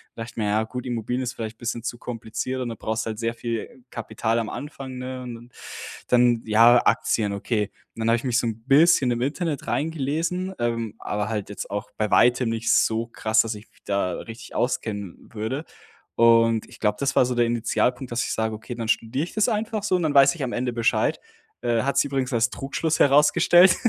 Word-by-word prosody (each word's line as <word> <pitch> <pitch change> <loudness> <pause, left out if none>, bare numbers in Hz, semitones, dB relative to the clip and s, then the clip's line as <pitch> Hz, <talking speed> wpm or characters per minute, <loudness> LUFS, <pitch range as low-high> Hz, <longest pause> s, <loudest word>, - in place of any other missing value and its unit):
Da - - -7
dachte 115 - -10
ich - - -29
mir: 110 - 0
„Ja, 110 +2 +2
gut, 125 +3 -6
Immobilien 125 +1 -2
ist 125 - -2
vielleicht 110 -2 -6
bisschen 120 0 -4
zu 120 0 -4
kompliziert.”, 115 +2 -4
und 125 - -2
dann 115 - -6
brauchst 110 +2 -2
du - - -3
halt 110 -1 -5
sehr 115 0 -1
viel 115 +2 -5
Kapital 115 +1 -1
am 110 -2 -3
Anfang, 135 -3 -7
ne? 130 0 -5
Und 125 -1 -6
dann 120 +1 -13 0.6
dann 120 -2 +4
ja, 115 +3 +6
Aktien, 105 -3 +2
okay. 105 0 -1 0.2
Und - - -12
dann 110 - +1
habe 115 - +4
ich 120 - -7
mich 125 -2 +1
so - - -1
'n 110 0 -4
bisschen 145 -1 +5
im 120 0 -1
Internet 150 +3 -2
reingelesen, 165 +5 -1
ähm, 115 -2 -2
aber 105 0 -3
halt 105 -3 -3
jetzt 105 - -6
auch 105 +1 -4
bei 105 -1 -1
weitem 125 0 +4
nicht 115 0 +1
so 115 +1 +2
krass, 110 -1 +2
dass 115 -1 -3
ich 105 +2 -13
mich - - -29
da 100 -3 0
richtig 115 0 -10
auskennen 110 -7 -3
würde. 115 +7 -3 0.5
Und 115 -1 +4
ich - - -15
glaube, 105 -1 +1
das 135 -1 0
war - - +5
so 125 0 -2
der 120 0 +3
Initialpunkt, 125 +2 0
dass 120 0 0
ich - - -2
sage: 110 0 -1
„Okay, 115 +3 -8
dann 115 -1 -4
studiere 120 +5 0
ich - - -12
das 215 +1 +2
einfach 215 -1 -2
so 205 -3 +1
und 180 - 0
dann 155 -2 +1
weiß 140 +1 +7
ich 155 - -4
am 125 - -2
Ende 125 0 -1
Bescheid.“ 115 -1 +1 0.4
Äh, 120 -2 +1
hat 140 +1 0
sich - - +4
übrigens 135 -2 -2
als 120 +1 +2
Trugschluss 150 +4 -2
herausgestellt. 170 +6 +6
120 Hz, 225 wpm, -24 LUFS, 115-135 Hz, 0.6 s, weiß